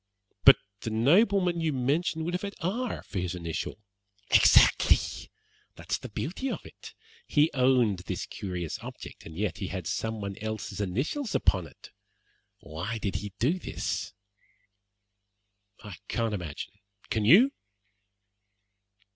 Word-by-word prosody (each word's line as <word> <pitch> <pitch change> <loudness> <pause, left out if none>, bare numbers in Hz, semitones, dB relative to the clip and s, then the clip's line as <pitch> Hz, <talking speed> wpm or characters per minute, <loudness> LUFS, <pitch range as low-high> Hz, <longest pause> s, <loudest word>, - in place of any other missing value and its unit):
"But - - +10 0.2
the 115 - -4
nobleman 175 - +3
you 160 -1 +1
mentioned 150 +5 0
would 175 - -2
have 180 - -1
had 200 0 -5
R 225 +8 -2
for 100 - -5
his 90 0 -2
initial." 85 0 -4 0.5
"Exactly! - - +6 0.8
That's - - -3
the - - -8
beauty 190 - -3
of - - -5
it. - - -12 0.3
He 150 +2 +3
owned 125 -7 +3
this 90 - -4
curious 90 -5 -5
object, - - -10
and 80 0 -10
yet 100 -4 -2
he 95 - -3
had 95 -2 -5
someone 105 -2 -3
else's 110 -2 -4
initials 135 - -2
upon 90 -4 +2
it. - - -16 0.7
Why 85 +9 -5
did 100 -3 -2
he 105 -2 -7
do 160 +10 +1
this?" - - -4 1.7
"I 105 -5 -8
can't 115 -2 -1
imagine; 85 -7 -5 0.4
can 110 - +1
you?" 215 - +7
110 Hz, 130 wpm, -28 LUFS, -, 1.7 s, But